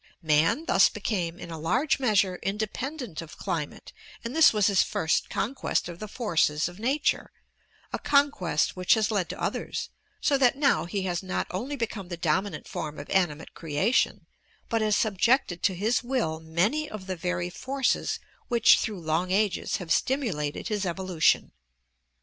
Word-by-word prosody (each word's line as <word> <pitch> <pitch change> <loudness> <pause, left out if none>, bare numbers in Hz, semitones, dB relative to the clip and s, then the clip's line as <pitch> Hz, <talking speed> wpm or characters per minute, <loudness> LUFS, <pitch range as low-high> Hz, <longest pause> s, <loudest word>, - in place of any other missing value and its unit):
Man 160 - +2
thus - - +5
became 175 -6 -3
in 170 - -9
a 160 - -6
large 255 - +1
measure 200 -7 +2
independent 215 - -4
of 165 -2 -11
climate 165 -7 -4 0.3
and 235 +4 -5
this 320 -1 +7
was 210 -3 +2
his 195 -1 +4
first 160 - 0
conquest 255 -3 -1
of 175 -1 -8
the 215 - -6
forces 165 -10 +1
of 175 +2 -10
nature, 270 +6 0 0.6
a - - -1
conquest 280 - +2
which 185 +3 +4
has 220 -1 +1
led 190 -5 0
to - - -6
others, - - -3 0.3
so 280 -2 +2
that 255 0 +4
now 275 - +2
he 190 +3 -3
has 175 -2 -1
not 185 -1 -2
only 245 +11 -3
become 225 -6 -4
the 175 -1 -5
dominant 180 +4 -1
form 155 -1 -5
of - - -8
animate 165 -5 0
creation, 165 - 0 0.4
but 225 -2 +1
has 215 -1 +2
subjected 215 -2 +2
to 190 - +1
his 215 +7 +1
will 240 -11 -1
many 185 - 0
of 210 -3 -8
the 185 -1 -3
very 180 0 -2
forces 265 +5 -1 0.3
which 235 -2 +5
through 210 -4 -3
long 160 +3 0
ages 200 -1 +1
have 175 -3 -5
stimulated 195 - -1
his 210 -2 -1
evolution. 180 -2 +1
195 Hz, 165 wpm, -27 LUFS, 170-235 Hz, 0.6 s, this